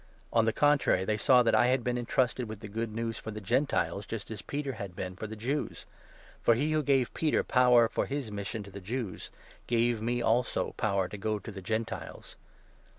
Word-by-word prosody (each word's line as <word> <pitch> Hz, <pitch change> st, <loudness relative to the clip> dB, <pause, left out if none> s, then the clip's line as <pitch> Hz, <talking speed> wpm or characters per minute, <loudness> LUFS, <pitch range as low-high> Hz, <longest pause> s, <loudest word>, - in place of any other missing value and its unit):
On 115 Hz, -1 st, +4 dB
the 115 Hz, -, +3 dB
contrary, 145 Hz, -9 st, +3 dB
they 110 Hz, -, +1 dB
saw 125 Hz, +4 st, +5 dB
that 115 Hz, -, +2 dB
I 120 Hz, -, +5 dB
had 130 Hz, -1 st, +2 dB
been 125 Hz, +1 st, 0 dB
entrusted 125 Hz, 0 st, 0 dB
with 110 Hz, -2 st, -7 dB
the 105 Hz, -, -7 dB
7 100 Hz, -, -14 dB
Good 115 Hz, -2 st, -3 dB
News 115 Hz, -1 st, -2 dB
for -, -, -7 dB
the 110 Hz, 0 st, -5 dB
Gentiles, 105 Hz, -2 st, 0 dB
just 115 Hz, -1 st, -5 dB
as 110 Hz, -, -5 dB
Peter 140 Hz, -1 st, -3 dB
had 100 Hz, -5 st, -7 dB
been 90 Hz, 0 st, -5 dB
for 110 Hz, -, -6 dB
the 110 Hz, -, -7 dB
Jews. 130 Hz, +7 st, -3 dB, 0.6 s
For 115 Hz, -, +4 dB
he 145 Hz, +6 st, 0 dB
who 155 Hz, 0 st, +2 dB
gave 135 Hz, -4 st, +2 dB
Peter 155 Hz, -2 st, +1 dB
power 125 Hz, -2 st, +5 dB
for -, -, -1 dB
his 135 Hz, -5 st, -3 dB
mission 105 Hz, +1 st, -4 dB
to 100 Hz, -, -12 dB
the 100 Hz, -, -8 dB
8 -, -, -17 dB
Jews 110 Hz, -2 st, -4 dB, 0.4 s
gave 120 Hz, -1 st, +2 dB
me, 120 Hz, +2 st, 0 dB
also, 120 Hz, +1 st, +1 dB
power 100 Hz, -4 st, 0 dB
to 105 Hz, -, -8 dB
go 110 Hz, +1 st, -1 dB
to 110 Hz, -, -8 dB
the 95 Hz, -1 st, -8 dB
Gentiles. 110 Hz, +4 st, -4 dB
115 Hz, 220 wpm, -30 LUFS, 105-125 Hz, 0.6 s, saw